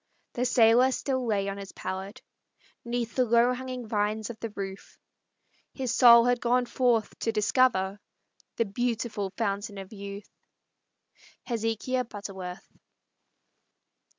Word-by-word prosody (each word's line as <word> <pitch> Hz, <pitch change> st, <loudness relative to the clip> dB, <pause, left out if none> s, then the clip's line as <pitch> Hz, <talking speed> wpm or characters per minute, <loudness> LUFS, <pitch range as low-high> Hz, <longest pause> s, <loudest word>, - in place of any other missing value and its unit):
The 245 Hz, -, -1 dB
sailor 245 Hz, +1 st, +5 dB
still 260 Hz, -1 st, -2 dB
lay 200 Hz, -3 st, 0 dB
on 195 Hz, 0 st, -4 dB
his 195 Hz, -1 st, -9 dB
pallet, 195 Hz, +5 st, -6 dB, 0.6 s
'Neath 235 Hz, -1 st, -3 dB
the 255 Hz, -, +2 dB
low 235 Hz, +1 st, +4 dB
hanging 255 Hz, -2 st, -6 dB
vines 215 Hz, +1 st, -1 dB
of 220 Hz, -, -13 dB
the 230 Hz, -, -4 dB
roof; 195 Hz, -2 st, -8 dB, 0.8 s
His 260 Hz, -3 st, -2 dB
soul 235 Hz, -2 st, +8 dB
had 245 Hz, -1 st, +2 dB
gone 245 Hz, +1 st, +2 dB
forth 240 Hz, -3 st, +1 dB
to 225 Hz, -, 0 dB
discover 210 Hz, -3 st, +2 dB, 0.6 s
The 230 Hz, -, +1 dB
beautiful 225 Hz, -1 st, -2 dB
Fountain 205 Hz, -1 st, -2 dB
of 195 Hz, +2 st, -9 dB
Youth. 200 Hz, 0 st, -8 dB, 1.1 s
HEZEKIAH 235 Hz, +2 st, -1 dB
BUTTERWORTH. 190 Hz, -4 st, -8 dB
225 Hz, 125 wpm, -28 LUFS, 200-245 Hz, 1.1 s, soul